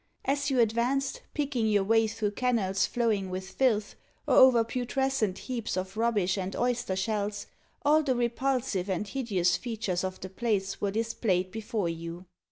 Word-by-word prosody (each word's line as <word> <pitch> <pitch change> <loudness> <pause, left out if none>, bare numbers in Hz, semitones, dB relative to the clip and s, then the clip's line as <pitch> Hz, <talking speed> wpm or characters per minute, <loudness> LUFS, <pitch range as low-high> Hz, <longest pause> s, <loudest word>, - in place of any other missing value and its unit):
As 285 +1 0
you 265 -2 +1
advanced, 245 - +1
picking 275 -6 0
your 205 -2 +3
way 225 +2 +3
through 215 -1 -2
kennels 210 -5 +1
flowing 215 -5 0
with 185 +1 -5
filth, 215 -3 +1 0.3
or - - +2
over 255 -3 +7
putrescent 250 -3 -1
heaps 240 -6 -4
of 190 +1 -4
rubbish 210 -4 +1
and 190 +1 -4
oyster 245 -5 0
shells, 205 +1 -2 0.4
all 305 +2 +5
the 270 -4 0
repulsive 240 -4 0
and 190 +2 -1
hideous 200 -8 +1
features 215 -7 -3
of 185 0 -4
the 190 - -6
place 195 -1 -1
were 205 - +1
displayed 200 -4 0
before 220 -2 -2
you. 165 +2 -6
220 Hz, 160 wpm, -29 LUFS, 190-250 Hz, 0.4 s, over